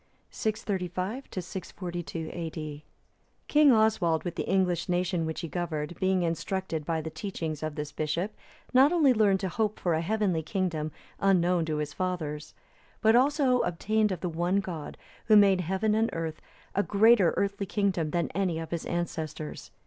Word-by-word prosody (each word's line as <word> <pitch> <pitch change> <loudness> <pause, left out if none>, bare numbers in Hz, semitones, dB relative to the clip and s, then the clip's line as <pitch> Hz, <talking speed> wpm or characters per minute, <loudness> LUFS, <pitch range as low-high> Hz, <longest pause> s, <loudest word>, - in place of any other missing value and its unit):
[635 205 +2 -2 0.2
642 175 -3 -6
A.D.] 155 -3 -6 0.6
King 300 -2 +6
Oswald, 215 -8 +3
with 175 - -3
the - - -4
English 185 -2 +1
nation 175 -2 0
which 160 - -4
he 165 - -4
governed, 160 -2 -3
being 190 -1 +2
instructed 165 0 -2
by 165 -1 0
the 160 0 -6
teaching 165 -6 -4
of 155 -1 -3
this 150 -1 -4
bishop, 170 +6 -2 0.4
not 265 +4 +6
only 310 -7 +5
learned 205 -4 +3
to 190 - -1
hope 215 +3 -1
for 175 - +1
a 160 - +1
heavenly 195 -2 0
kingdom 160 -3 -2 0.3
unknown 180 -3 +3
to 155 -1 -2
his 150 -1 -3
fathers, 160 -5 -3 0.5
but 220 0 +5
also 265 -1 +3
obtained 210 +4 +1
of 180 - -4
the 180 - -1
one 175 +4 +1
God, 175 -6 -6 0.3
Who 215 - +5
made 195 -2 +5
heaven 190 +5 0
and 225 +1 +2
earth, 165 -1 -4 0.3
a 200 - +2
greater 205 -2 +4
earthly 200 0 -1
kingdom 185 -6 0
than 170 +2 0
any 180 -2 -1
of 165 0 -6
his 170 -1 -3
ancestors. 160 -3 -4
180 Hz, 165 wpm, -28 LUFS, 165-205 Hz, 0.6 s, King